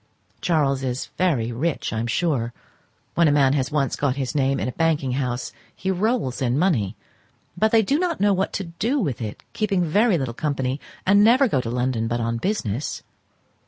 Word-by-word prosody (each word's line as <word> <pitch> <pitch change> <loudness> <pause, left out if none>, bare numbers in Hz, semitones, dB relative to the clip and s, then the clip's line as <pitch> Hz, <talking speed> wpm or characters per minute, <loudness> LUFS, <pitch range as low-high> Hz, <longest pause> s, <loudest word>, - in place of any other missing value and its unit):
Charles 145 -6 +1
is 130 -1 -3
very 135 -11 +1
rich 140 +5 -2
I 110 - -1
am 115 - -2
sure; 120 -2 0 0.6
when 170 -1 +4
a - - +4
man 140 -2 +4
has 135 0 0
once 140 -3 0
got 140 -3 0
his 135 -1 -3
name 135 -2 +1
in - - -1
a - - -2
banking 155 -3 0
house 125 -2 -2 0.2
he 190 - -2
rolls 195 - 0
in 125 0 +1
money; 125 - +1 0.6
but 215 +4 +2
they 225 -1 +5
do 280 +9 +1
not 350 -3 -1
know 205 0 +4
what 190 +1 0
to 200 - -2
do 190 +11 -2
with 140 - -2
it, 105 -2 -6
keep 215 -1 -1
very 195 +2 +3
little 130 -5 -3
company, 135 -1 -2 0.3
and 200 +2 +5
never 255 +5 +5
go 135 - +1
to 115 - -5
London 125 -1 -1
but 120 +1 -1
on 115 0 -1
business. 130 - -2
145 Hz, 195 wpm, -23 LUFS, 125-190 Hz, 0.6 s, they